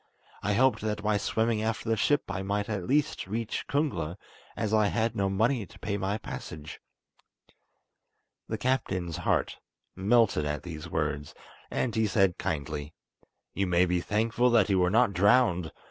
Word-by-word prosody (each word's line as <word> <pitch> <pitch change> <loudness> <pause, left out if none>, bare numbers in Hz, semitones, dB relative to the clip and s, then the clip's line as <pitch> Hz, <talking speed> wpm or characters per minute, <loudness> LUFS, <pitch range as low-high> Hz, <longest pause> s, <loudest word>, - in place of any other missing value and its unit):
I 105 +1 0
hoped 130 +5 +3
that 105 -1 -2
by 105 -1 +2
swimming 110 +1 0
after 110 +1 -2
the 115 - +2
ship 145 +8 +2
I 95 - -3
might 100 +1 -1
at 100 -5 -3
last 145 -7 +1
reach 110 +3 -3
Kungla, 125 - -1 0.4
as 110 -1 -1
I 105 -1 +4
had 115 +2 0
no 100 -1 +1
money 110 +2 +1
to - - -16
pay 100 - -3
my 100 +1 -1
passage." 75 -7 -8 1.7
The 110 - -3
captain's 95 - -1
heart - - 0 0.4
melted 105 -3 +3
at 75 0 -3
these 85 -1 -7
words, 75 -2 -2 0.3
and 120 - -1
he 110 0 +2
said 95 -4 +2
kindly: 75 0 -3 0.6
"You 100 +1 0
may 90 0 +4
be 90 0 0
thankful 115 +5 +1
that 115 -5 +4
you 95 -2 +3
were 90 0 +3
not 110 +1 +3
drowned. 95 - +3
100 Hz, 160 wpm, -28 LUFS, 90-115 Hz, 1.7 s, I